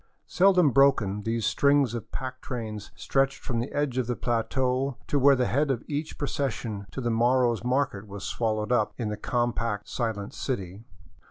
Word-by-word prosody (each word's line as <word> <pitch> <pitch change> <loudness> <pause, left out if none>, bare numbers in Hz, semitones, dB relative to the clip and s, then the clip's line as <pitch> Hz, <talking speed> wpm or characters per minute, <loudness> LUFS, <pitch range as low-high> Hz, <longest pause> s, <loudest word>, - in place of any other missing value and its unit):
Seldom 180 -5 +4
broken, 120 -7 +3
these 115 +1 -1
strings 140 +1 +3
of 115 -2 -6
pack 130 0 -5
trains 110 -4 -5
stretched 135 0 +1
from 120 -2 -3
the 120 - -3
edge 145 -3 -1
of 125 - -1
the 120 - -1
plateau 125 +3 0
to 145 - 0
where 140 +1 +6
the 125 -1 +1
head 140 +4 +1
of 125 -3 -1
each 150 +1 -4
pro 145 - -2
cession 120 -7 -3
to 135 - -5
the 120 -1 0
morrow's 120 0 +2
market 125 -5 0
was 100 0 -8
swallowed 110 -1 -1
up 115 -4 +1
in 115 -4 -2
the 105 - -2
compact, 115 -2 -1
silent 110 -4 -3
city. 100 -4 -4
120 Hz, 180 wpm, -27 LUFS, 110-135 Hz, -, where